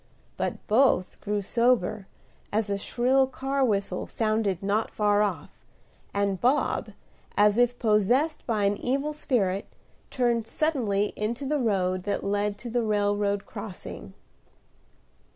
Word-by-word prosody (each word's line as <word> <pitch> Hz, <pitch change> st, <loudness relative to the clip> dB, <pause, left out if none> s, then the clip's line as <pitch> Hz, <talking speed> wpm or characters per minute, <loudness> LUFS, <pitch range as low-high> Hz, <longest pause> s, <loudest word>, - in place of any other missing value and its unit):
But -, -, -3 dB
both 220 Hz, -5 st, +2 dB
grew 205 Hz, 0 st, -2 dB
sober 220 Hz, -3 st, +1 dB, 0.4 s
as 210 Hz, -1 st, 0 dB
a 200 Hz, -, 0 dB
shrill 260 Hz, +5 st, +2 dB
car 270 Hz, +1 st, -1 dB
whistle 200 Hz, -6 st, 0 dB
sounded 215 Hz, -4 st, 0 dB
not 205 Hz, +3 st, 0 dB
far 205 Hz, -1 st, +2 dB
off; 210 Hz, -, -3 dB, 0.5 s
and 200 Hz, -2 st, -1 dB
Bob, 260 Hz, +5 st, +1 dB, 0.4 s
as 210 Hz, +2 st, +4 dB
if 245 Hz, 0 st, +3 dB
possessed 240 Hz, +8 st, +2 dB
by 215 Hz, -4 st, +1 dB
an 200 Hz, 0 st, +2 dB
evil 275 Hz, +4 st, -1 dB
spirit, 205 Hz, -10 st, 0 dB, 0.4 s
turned 240 Hz, -4 st, 0 dB
suddenly 225 Hz, -10 st, 0 dB
into 235 Hz, +6 st, -3 dB
the 295 Hz, +2 st, 0 dB
road 185 Hz, -6 st, +1 dB
that 205 Hz, -, -1 dB
led 205 Hz, 0 st, 0 dB
to 240 Hz, -, -7 dB
the 240 Hz, +1 st, +1 dB
railroad 205 Hz, -2 st, 0 dB
crossing. 195 Hz, -, -8 dB
215 Hz, 130 wpm, -27 LUFS, 200-245 Hz, 0.5 s, as